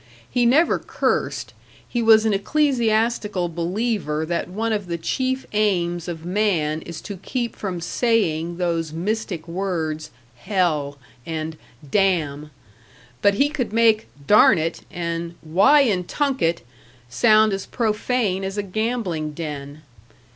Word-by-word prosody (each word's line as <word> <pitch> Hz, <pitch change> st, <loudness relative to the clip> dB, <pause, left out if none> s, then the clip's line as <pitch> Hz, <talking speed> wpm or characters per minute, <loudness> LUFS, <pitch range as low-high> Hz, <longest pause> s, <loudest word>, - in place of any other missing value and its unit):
He 245 Hz, -1 st, +2 dB
never 300 Hz, +8 st, +4 dB
cursed; -, -, -2 dB, 0.3 s
he 240 Hz, -, -1 dB
was 225 Hz, -1 st, +6 dB
an 220 Hz, -, +2 dB
ecclesiastical 225 Hz, -5 st, +1 dB
believer 170 Hz, -2 st, -1 dB
that 170 Hz, +1 st, -2 dB
one 220 Hz, +4 st, -1 dB
of 205 Hz, -3 st, -2 dB
the 170 Hz, -1 st, -2 dB
chief 260 Hz, +10 st, -1 dB
aims 175 Hz, -5 st, 0 dB
of 165 Hz, -1 st, -6 dB
man 175 Hz, -6 st, 0 dB
is 165 Hz, -1 st, -8 dB
to 200 Hz, -, -7 dB
keep 235 Hz, +5 st, -3 dB
from 185 Hz, -4 st, -4 dB
saying 170 Hz, -4 st, 0 dB
those 165 Hz, -3 st, -1 dB
mystic 180 Hz, 0 st, -3 dB
words 165 Hz, -4 st, -3 dB, 0.3 s
"hell" 150 Hz, -, 0 dB, 0.3 s
and 160 Hz, +1 st, -4 dB, 0.3 s
"damn"; 155 Hz, -5 st, +1 dB, 0.7 s
but 200 Hz, 0 st, +4 dB
he 280 Hz, +7 st, +3 dB
could 280 Hz, -7 st, -3 dB
make 225 Hz, -1 st, +3 dB, 0.2 s
"darn 210 Hz, +1 st, +6 dB
it" 165 Hz, +1 st, -2 dB
and 170 Hz, 0 st, -4 dB
"why 190 Hz, -, +5 dB
in 205 Hz, -9 st, +1 dB
tunket" 225 Hz, -, 0 dB, 0.5 s
sound 215 Hz, -, +4 dB
as 195 Hz, 0 st, -4 dB
profane 215 Hz, -3 st, 0 dB
as 195 Hz, +1 st, -4 dB
a 205 Hz, -, 0 dB
gambling 195 Hz, -7 st, -2 dB
den.... 150 Hz, -1 st, -6 dB
190 Hz, 130 wpm, -22 LUFS, 165-220 Hz, 0.7 s, was